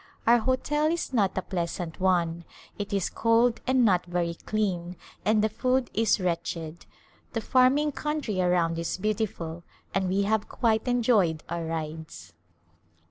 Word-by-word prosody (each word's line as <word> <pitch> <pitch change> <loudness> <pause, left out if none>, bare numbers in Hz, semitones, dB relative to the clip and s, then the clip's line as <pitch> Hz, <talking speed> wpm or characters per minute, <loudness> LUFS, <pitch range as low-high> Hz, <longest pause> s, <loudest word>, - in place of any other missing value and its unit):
Our 235 +1 +6
hotel 280 +5 +1
is 330 -4 -2
not 200 -6 +1
a 190 - 0
pleasant 170 -2 -4
one; 170 -3 +1 0.4
ft 205 - -4
is 195 -3 0
cold 230 +1 +2
and 260 -1 +4
not 180 -4 +2
very 175 -1 -1
clean 180 -2 -2 0.3
and 215 0 +3
the - - +4
food 255 +3 0
is 220 -1 +2
wretched. 170 -2 -3 0.5
The 225 - -1
farming 265 +5 +3
country 290 -10 -2
around 175 -2 +1
is 165 +1 -2
beautiful 190 -5 -2 0.3
and 190 -1 0
we 195 +2 +1
have 210 +1 0
quite 225 -1 +1
enjoyed 220 -10 +2
our 170 0 -3
rides. 155 - -6
200 Hz, 145 wpm, -27 LUFS, 170-235 Hz, 0.5 s, Our